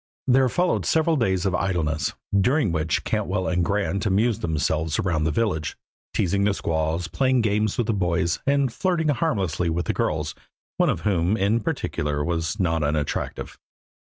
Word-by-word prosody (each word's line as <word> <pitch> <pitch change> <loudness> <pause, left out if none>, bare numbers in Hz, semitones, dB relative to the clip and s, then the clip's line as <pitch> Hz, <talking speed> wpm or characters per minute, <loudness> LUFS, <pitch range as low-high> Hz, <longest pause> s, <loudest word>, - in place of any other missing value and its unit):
There 130 0 +4
followed 180 +8 +1
several 160 0 +3
days 95 - +1
of 95 - +1
idleness, 80 -6 -1 0.2
during 110 - +3
which 80 -2 0
Cantwell 95 0 -1
and 90 -1 +1
Grant 100 0 0
amused 110 +3 +1
themselves 80 0 0
around 80 -5 0
the 80 - +1
village, 80 -6 -1 0.3
teasing 100 +2 +1
the 100 0 +2
squaws, 80 0 -1
playing 130 +6 +2
games 105 -1 0
with 120 - +1
the 115 - 0
boys, 85 -3 0
and 140 -3 +2
flirting 170 0 0
harmlessly 100 - 0
with 85 +2 -1
the - - 0
girls, 75 0 -1 0.4
one - - +3
of - - -1
whom, 95 0 +1
in 105 +3 +2
particular, 75 -8 -2
was 85 +5 -2
not 80 -3 +1
unattractive. 75 0 -2
95 Hz, 160 wpm, -24 LUFS, 80-115 Hz, 0.4 s, There